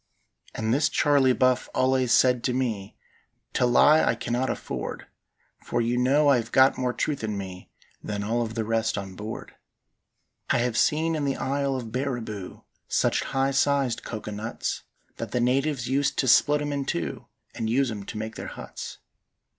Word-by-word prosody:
And 110 +1 0
this 145 +3 +3
Charley 140 -3 +3
Buff 130 0 +2
allays 130 -1 +2
said 125 -2 +4
to 125 - +1
me: 110 -7 -2 0.6
"To 125 - +2
lie 150 +6 +6
I - - +2
cannot 120 +2 -1
afford, - - -5 0.5
For 120 - -2
you 120 +1 +1
know 135 +4 +3
I 140 -3 +6
hev 115 0 -4
got 130 +1 +5
more 125 -1 -1
truth 140 +1 -2
in 105 -2 -2
me 95 -2 -7 0.3
Than 105 -1 -3
all 115 +3 0
of 110 -1 -3
the 110 -2 -1
rest 115 0 0
on 95 -1 -5
board. 105 +3 -7 1.0
"I - - +3
have 120 -1 0
seen 155 +8 +2
in 155 -2 -1
the 140 -1 0
isle 140 0 -1
of 120 -4 -5
Barriboo 120 -7 -4 0.2
Such - - +1
high 135 0 0
sized 135 -3 +1
coco 110 -1 -6
nuts, 105 +3 -4 0.4
That - - -6
the 125 - +1
natives 130 +1 +1
used 140 +2 +1
to 130 - +1
split 145 +3 +5
'em 145 0 -2
in 140 -1 -2
two 85 -9 -3 0.3
And 115 -2 -3
use 130 +1 +2
'em 105 -2 -5
to - - -7
make 110 +1 -5
their - - -6
huts. - - -8
125 Hz, 180 wpm, -26 LUFS, 110-135 Hz, 1.0 s, lie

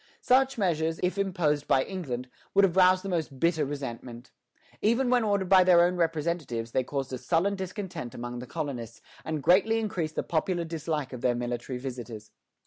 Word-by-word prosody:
Such 265 +1 +3
measures, 165 -5 0
if 185 +2 0
imposed 165 -7 0
by 130 - +3
England, 130 -10 -5 0.3
would 200 - +6
have 180 -2 -1
roused 185 0 +5
the - - -5
most 160 -7 -3
bitter 165 -1 +2
resentment. 130 -3 -6 0.5
Even 245 +4 +2
when 245 -2 +4
ordered 200 -3 +1
by 190 0 +7
their 180 -1 +6
own 180 +1 +2
representatives, 160 -8 -1
they 130 - +1
caused 135 0 -4
a 130 - -3
sullen 180 +7 +1
discontent 190 - -6
among 120 0 -5
the 125 - -8
colonists, 125 -7 -5 0.2
and 155 -3 -3
greatly 200 - +4
increased 180 -8 -2
the - - -1
popular 170 +2 -1
dislike 155 -4 -3
of 125 - -7
their 125 -1 +2
military 120 +1 -3
visitors. 120 -4 -7
160 Hz, 180 wpm, -28 LUFS, 130-185 Hz, 0.5 s, by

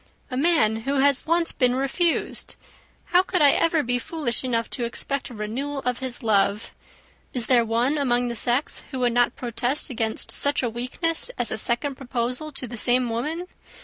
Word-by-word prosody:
"A - - -3
man 265 -7 +3
who 270 +6 -2
has 280 +2 +2
once 335 +1 +2
been 250 -2 +2
refused! 275 +6 0 0.6
How 355 - +7
could 370 -3 0
I 285 - +7
ever 325 -2 +2
be 245 +1 0
foolish 275 -4 -2
enough 230 -3 -1
to 245 - -2
expect 275 +3 -3
a 245 - -10
renewal 250 +7 -4
of 250 -1 -1
his 260 -1 -4
love? 205 -1 +1 0.6
Is 245 -3 +2
there 245 -2 +4
one 240 +6 +1
among 245 -3 +1
the 235 - -3
sex 245 +5 0
who 265 - -5
would 245 -1 +2
not 245 0 +2
protest 245 +4 -2
against 225 -2 -1
such 285 -1 +1
a 240 - +1
weakness 255 - -1
as 240 - -2
a - - -2
second 260 +4 +1
proposal 250 +3 -3
to 265 -3 -3
the 240 +1 -7
same 245 +1 +3
woman? 305 +10 -3
250 Hz, 185 wpm, -24 LUFS, 235-285 Hz, 0.6 s, How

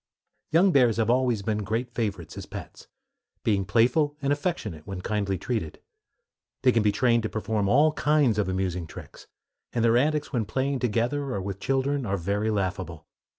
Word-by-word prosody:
Young 185 +4 +5
bears 125 -7 +4
have 115 0 +2
always 125 -4 +1
been 105 0 -1
great 115 +4 -2
favorites 100 -9 -3
as - - -7
pets, - - -9 0.6
being 100 -3 +1
playful 125 +8 +2
and 140 -1 +1
affectionate 120 - -3
when 95 -2 -5
kindly 100 -1 -1
treated. 110 -6 -3 0.8
They 130 - +6
can 115 - +2
be 105 -1 +3
trained 115 +2 +2
to 110 - -3
perform 110 -2 -1
all 150 +6 +4
kinds 145 -8 +2
of 100 -3 0
amusing 90 -2 -2
tricks; - - -12 0.5
and 120 -1 +1
their 115 +1 +4
antics 150 +3 0
when 115 -4 0
playing 135 +4 -1
together 125 +3 -1
or - - -1
with 100 0 -5
children 135 +2 0
are 100 +1 0
very 100 +5 -1
laughable. 95 -6 -3
115 Hz, 175 wpm, -26 LUFS, 100-130 Hz, 0.8 s, They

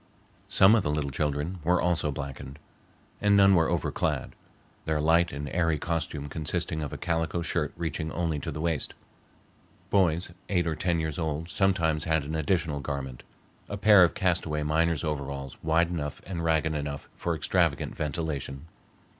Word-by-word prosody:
Some 95 +3 +6
of 115 - +4
the 75 - -2
little 75 -2 -1
children 75 +6 -2
were 90 +2 +3
also 85 -4 +1
blackened, 70 -1 -7 0.6
and 105 -1 +4
none 100 0 +7
were 85 -3 +4
over - - 0
clad, - - -1 0.5
their 80 -1 0
light 85 +3 +3
and 70 +1 -5
airy 80 0 +1
costume 75 -2 -3
consisting 80 +2 -1
of 75 - -4
a - - -5
calico 80 0 -1
shirt 85 -3 -1
reaching 80 -1 -3
only 80 -3 -1
to - - -5
the 75 - -4
waist. 80 -3 -1 1.0
Boys 90 -3 +2 0.2
eight 90 -3 +2
or 80 -2 -1
ten 85 +1 0
years 80 -1 -3
old 80 0 -2
sometimes 85 -6 +1
had 80 -2 +1
an 75 +3 -5
additional 80 -1 0
garment,—a 70 +7 -7
pair 105 -2 +7
of 85 - +2
castaway 85 -4 0
miner's 80 0 +1
overalls 70 -3 -4
wide 80 +2 +2
enough 75 -5 -4
and 85 -3 -4
ragged 80 -1 +2
enough 70 -1 -4
for 85 -1 -2
extravagant 80 - +1
ventilation. 75 -2 -3
80 Hz, 165 wpm, -28 LUFS, 75-85 Hz, 1.0 s, none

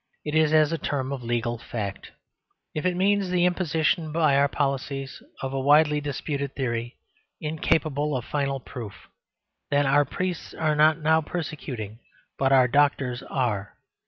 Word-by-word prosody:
It 150 - -3
is 155 -1 +4
as 155 -1 +4
a 165 - -1
term 135 -2 -2
of 135 - -5
legal 120 0 -2
fact. 105 -4 -5 0.6
If 155 +4 -1
it 180 - 0
means 195 +1 +2
the 180 -1 +2
imposition 165 -2 +1
by 155 -2 +3
the 140 - +4
police 135 -1 -3 0.2
of 135 0 -3
a 135 - -1
widely 150 +2 +4
disputed 140 -1 -3
theory, 120 -2 -2 0.4
incapable 150 -2 0
of 125 - -6
final 140 -2 -1
proof 115 -5 -8 0.7
then 145 0 +2
our 140 +2 +4
priests 180 +5 -4
are 155 -1 +1
not 155 +1 +5
now 160 0 +3
persecuting, 135 - -5 0.4
but 135 0 +2
our 130 -2 +6
doctors 135 -2 +2
are. 115 -8 -2
145 Hz, 155 wpm, -25 LUFS, 130-155 Hz, 0.7 s, our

